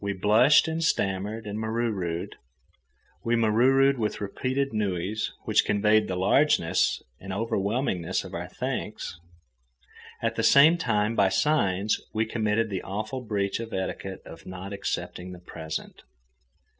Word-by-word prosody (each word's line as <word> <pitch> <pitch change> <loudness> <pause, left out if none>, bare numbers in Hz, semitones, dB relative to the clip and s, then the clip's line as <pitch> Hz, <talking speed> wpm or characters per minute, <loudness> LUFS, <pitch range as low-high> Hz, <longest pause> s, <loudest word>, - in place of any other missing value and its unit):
We 100 0 -1
blushed, 110 - +5
and 160 +1 -2
stammered, 105 -5 -1
and 105 +1 -4
mauruuru'd. 110 -7 -2 0.9
We 115 +1 +1
mauruuru'd 130 +4 +4
with 105 -2 -1
repeated 130 +6 -2
nui's 105 0 -1
which - - +3
conveyed 105 +1 +3
the 90 - -2
largeness 95 - +2 0.2
and 95 - -8
overwhelmingness 100 -2 -1
of - - -10
our - - -4
thanks. 85 - -5 1.0
At - - -2
the - - +1
same 155 +5 +7
time, 105 -5 +1
by 100 -3 +4
signs, 100 -7 +1
we 110 +1 +2
committed 110 -1 0
the 95 - -2
awful 110 +7 -4
breach 100 -4 -2
of 115 -1 -6
etiquette 95 0 -4
of - - -12
not 95 +2 -7
accepting 90 -2 -4
the 90 - -10
present. 80 -3 -7
105 Hz, 135 wpm, -26 LUFS, 95-115 Hz, 1.0 s, same